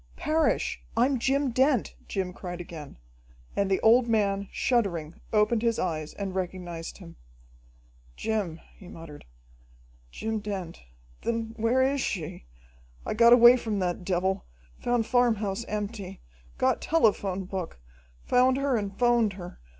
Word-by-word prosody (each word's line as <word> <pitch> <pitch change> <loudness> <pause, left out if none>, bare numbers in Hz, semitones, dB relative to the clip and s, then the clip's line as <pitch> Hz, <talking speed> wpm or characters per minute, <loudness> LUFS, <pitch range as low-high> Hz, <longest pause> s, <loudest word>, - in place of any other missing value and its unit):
"Parrish, 315 +1 0 0.2
I'm 255 +2 +3
Jim 270 +2 +1
Dent!" 260 0 +2
Jim 185 -2 -3
cried 180 -1 -7
again, 165 -4 -9 0.6
and 200 -1 +1
the 190 - +2
old 235 +2 +5
man, 200 -3 +1
shuddering, 175 -10 -1
opened 215 +1 +3
his 230 -1 +1
eyes 155 -4 -3
and 195 -2 -4
recognized 175 -3 -5
him. 170 -4 -13 1.0
"Jim!" 200 -7 -2 0.2
he 185 - -13
muttered. 165 -4 -11 0.8
"Jim 220 - -3
Dent! 195 -5 -6 0.4
Then 230 -1 -2
where 235 +4 +2
is 275 +1 +1
she? 160 - -4 0.6
I - - -2
got 235 +2 +6
away 245 +1 +8
from 220 -4 -3
that 180 -1 -2
devil, 190 +1 0 0.4
found 240 -2 0
farmhouse 230 -4 +1
empty, 205 -2 -5 0.4
got - - +1
telephone 200 - +1
book, 185 - -5 0.4
found 255 +1 +3
her 275 -1 +1
and 200 -3 -3
'phoned 240 -4 +3
her. 180 -2 -9
210 Hz, 135 wpm, -27 LUFS, 185-235 Hz, 1.0 s, away